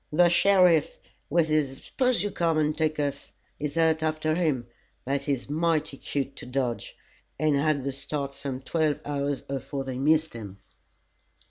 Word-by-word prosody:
The 175 +3 +5
sheriff 180 -3 +4 0.3
with 165 +1 +3
his 150 -4 +1
'spose 250 -7 +1
you 205 - -2
come 165 -2 +1
and 150 0 +1
take 155 -1 0
us' 140 -1 -2 0.3
is 150 +2 -3
out 160 -1 +3
after 155 0 0
him, 155 -8 0 0.4
but 135 +1 0
he's 140 -4 -1
mighty 155 -1 0
cute 135 0 -3
to - - -8
dodge, 125 -2 -2 0.4
and 155 -2 +2
had 140 -1 +1
the 140 - -1
start 140 +1 -4
some 135 -2 -5
twelve 155 +2 0
hours 140 -1 -2
afore 135 0 -4
they 130 -1 -5
missed 155 +3 +2
him." 105 -4 -8
150 Hz, 160 wpm, -27 LUFS, 140-160 Hz, 0.4 s, The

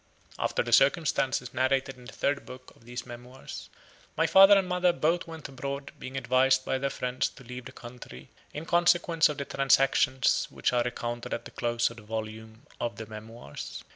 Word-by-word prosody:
After - - 0
the 120 - -3
circumstances 135 -2 +2
narrated 130 +1 0
in 125 -1 -15
the 120 - -9
third 140 0 -1
book 130 0 -12
of 115 - -23
these 120 0 -6
Memoirs, 125 +2 -10 0.5
my - - +3
father 195 +1 +8
and 190 -2 +1
mother 180 0 +2
both 170 +1 0
went 160 -2 -8
abroad, 140 +1 -6
being 130 +1 -6
advised 130 +1 +3
by 130 - -1
their 140 +1 -1
friends 125 -1 -2
to 135 - -16
leave 125 0 -8
the 130 - -8
country 120 - -11 0.2
in 150 +2 -6
consequence 170 -1 +3
of 150 - -4
the 140 - -3
transactions 135 -1 +2
which - - -1
are 120 - +3
recounted 120 0 -3
at 120 - -8
the - - -10
close 120 -1 0
of 115 - -13
the - - -10
volume 110 +1 -7
of 120 -1 -2
the 110 - -6
Memoirs. 110 +2 -9
130 Hz, 190 wpm, -28 LUFS, 120-140 Hz, 0.5 s, father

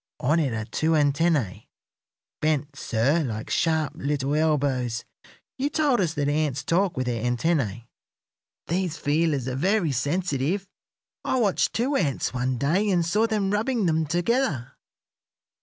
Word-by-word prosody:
On 155 +3 +2
it 145 -5 +1
are 110 -1 -3
two 155 +8 0
antennæ, 145 - +1 0.7
bent, 150 -2 0
sir, 140 +6 +1
like 110 -5 -5
sharp 160 -3 +1
little 140 0 -1
elbows. 140 -6 0 0.5
You 280 +2 +1
told 295 -5 +2
us 165 -3 -1
that 145 -1 0
ants 145 -2 0
talk 180 0 +1
with 130 - 0
their 120 -2 -2
antennæ. 120 - 0 0.8
These 175 -2 -1
feelers 145 -3 0
are 130 - -2
very 180 +2 +1
sensitive. 155 - -1 0.6
I 260 - 0
watched 205 -5 +1
two 260 +5 0
ants 145 - 0
one 125 0 -1
day 170 - +1
and 175 -3 +2
saw 210 +7 +2
them 210 -3 0
rubbing 220 +1 0
them 160 -2 +1
together." 175 - 0
155 Hz, 140 wpm, -25 LUFS, 135-185 Hz, 0.8 s, On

